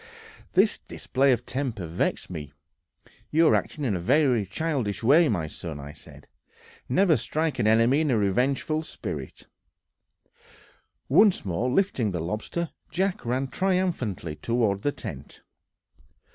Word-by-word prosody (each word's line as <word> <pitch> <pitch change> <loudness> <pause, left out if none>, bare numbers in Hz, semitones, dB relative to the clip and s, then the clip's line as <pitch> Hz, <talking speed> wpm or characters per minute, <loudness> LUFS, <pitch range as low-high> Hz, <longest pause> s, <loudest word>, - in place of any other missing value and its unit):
This 195 +3 +3
display 135 +1 0
of 120 -1 0
temper 125 -8 -3
vexed 85 +3 -2
me. 75 -4 -7 0.8
"You 160 +1 +4
are - - +4
acting 150 -2 -1
in 110 -6 +1
a - - -2
very 120 - +2
childish 120 - -2
way, 150 +6 +5
my 90 -7 0
son," 80 0 -7 0.2
said 75 - -15
I; - - -44 0.4
"never 170 +5 +4
strike 155 +6 -2
an 105 - +2
enemy 115 +6 +4
in 155 - 0
a 120 - +3
revengeful 130 +9 +1
spirit." 155 - -7 1.6
Once 205 - +4
more 95 +7 -1
lifting 130 - +1
the 90 -3 -3
lobster, 105 - -3 0.2
Jack 190 +4 -1
ran 130 +3 -1
triumphantly 170 - -1
toward 115 -4 0
the 145 - +1
tent. 70 - -9
125 Hz, 135 wpm, -26 LUFS, 100-155 Hz, 1.6 s, way